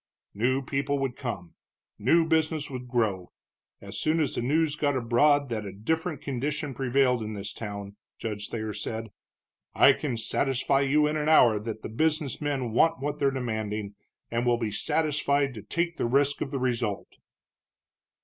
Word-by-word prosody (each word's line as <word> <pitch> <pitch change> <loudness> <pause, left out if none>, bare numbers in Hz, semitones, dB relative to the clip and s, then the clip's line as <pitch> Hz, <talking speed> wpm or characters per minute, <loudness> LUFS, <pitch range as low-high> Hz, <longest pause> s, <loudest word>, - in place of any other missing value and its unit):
"New 130 +6 +1
people 140 +2 -1
would 135 -3 -2
come, 100 -11 -5 0.5
new 165 +10 +4
business 160 -2 0
would 125 -1 -6
grow, 110 -7 -1 0.5
as - - -7
soon 155 +1 +1
as 150 -4 0
the - - -2
news 150 +4 +1
got 145 -2 +1
abroad 140 +4 +3
that 110 -2 -2
a 100 - -6
different 160 - -2
condition 140 +2 -2
prevailed 125 -1 +2
in 110 0 -4
this 100 0 -5
town," 100 -2 -6 0.2
Judge 105 -2 -4
Thayer 110 -2 -3
said. 110 +2 -4 0.7
"I - - +7
can 130 -6 -3
satisfy 135 +4 +1
you 145 +2 +3
in 150 +1 0
an 150 0 0
hour 120 -9 +6
that 110 0 -6
the - - -5
business 150 +3 0
men 135 -5 -1
want 160 +6 +3
what 145 +2 -3
they're 140 - +3
demanding, 110 -5 -3 0.4
and 115 +1 0
will 120 -1 +3
be 115 -3 -2
satisfied 140 +3 +1
to 110 - -8
take 170 - -2
the - - 0
risk 140 +3 +2
of 140 - -2
the 135 - -3
result." 120 -5 -2
130 Hz, 170 wpm, -27 LUFS, 110-145 Hz, 0.7 s, I